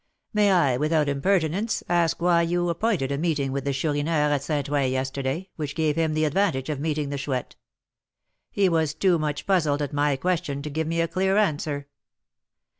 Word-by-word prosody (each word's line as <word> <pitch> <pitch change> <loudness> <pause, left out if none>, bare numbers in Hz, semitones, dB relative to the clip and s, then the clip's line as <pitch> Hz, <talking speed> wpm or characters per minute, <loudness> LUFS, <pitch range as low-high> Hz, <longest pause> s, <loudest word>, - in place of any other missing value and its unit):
"May 210 -1 +4
I, 145 -9 +3
without 155 +1 +1
impertinence, 180 +7 0
ask 170 -1 +1
why 175 -1 +4
you 175 +1 0
appointed 170 - 0
a 140 - -1
meeting 150 -5 0
with 140 0 -3
the 140 - +1
Chourineur 150 +2 0
at 140 - 0
St. 145 -1 -2
Ouen 140 -2 +1
yesterday, 135 +6 -3
which 145 -3 -4
gave 155 -2 +1
him 160 -1 0
the 155 0 +2
advantage 150 -4 0
of 150 -3 -2
meeting 150 -1 -1
the 140 -1 -3
Chouette? 130 -2 -3 0.9
He 200 -1 +2
was 160 -3 +1
too 175 0 +2
much 150 -1 -3
puzzled 160 -7 +2
at 145 - -5
my 145 -1 +2
question 145 -3 -2
to 150 - -5
give 160 +2 -2
me 165 +1 0
a 165 - +1
clear 190 +3 +1
answer." 150 -7 0
155 Hz, 190 wpm, -25 LUFS, 140-170 Hz, 0.9 s, May